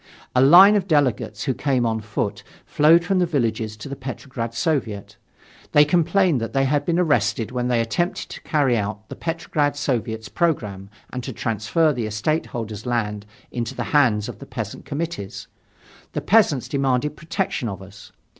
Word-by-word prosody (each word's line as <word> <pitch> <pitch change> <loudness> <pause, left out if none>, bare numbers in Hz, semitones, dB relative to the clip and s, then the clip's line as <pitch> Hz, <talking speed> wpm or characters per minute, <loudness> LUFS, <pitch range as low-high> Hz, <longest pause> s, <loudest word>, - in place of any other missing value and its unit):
A 125 - +5
line 180 +9 +8
of 195 -2 0
delegates, 130 - +1
who 130 - 0
came 130 -2 0
on 110 -1 -1
foot, 105 -1 -3 0.2
flowed 165 +3 +4
from 195 -2 +1
the 180 - +2
villages 110 -7 -1
to 110 - -8
the 140 - -5
Petrograd 130 -3 -6
Soviet. 115 -8 -2 0.6
They 150 0 +7
complained 170 - +2
that 115 - -4
they 135 0 +2
had 145 +1 +1
been 170 -1 +1
arrested 145 -9 +1
when 125 -1 -1
they 120 -1 +2
attempted 145 +10 -1
to - - -9
carry 140 -5 +1
out 105 0 -3
the - - -7
Petrograd 155 -3 -1
Soviet's 115 -6 -2
programme 105 - -1 0.2
and 125 -1 -4
to 130 - -5
transfer 115 - 0
the 120 -4 -3
estate 115 +10 -1
holder's 110 -1 -6
land 105 -4 -2 0.2
into 120 -2 -4
the - - -2
hands 120 -8 +3
of - - -8
the - - -10
peasant - - -6
committees. 155 -9 -5 0.7
The - - -2
peasants 185 - +3
demanded 135 +1 0
protection 170 - -2
of 95 -1 -7
us. 100 +1 -14
130 Hz, 175 wpm, -22 LUFS, 110-155 Hz, 0.7 s, line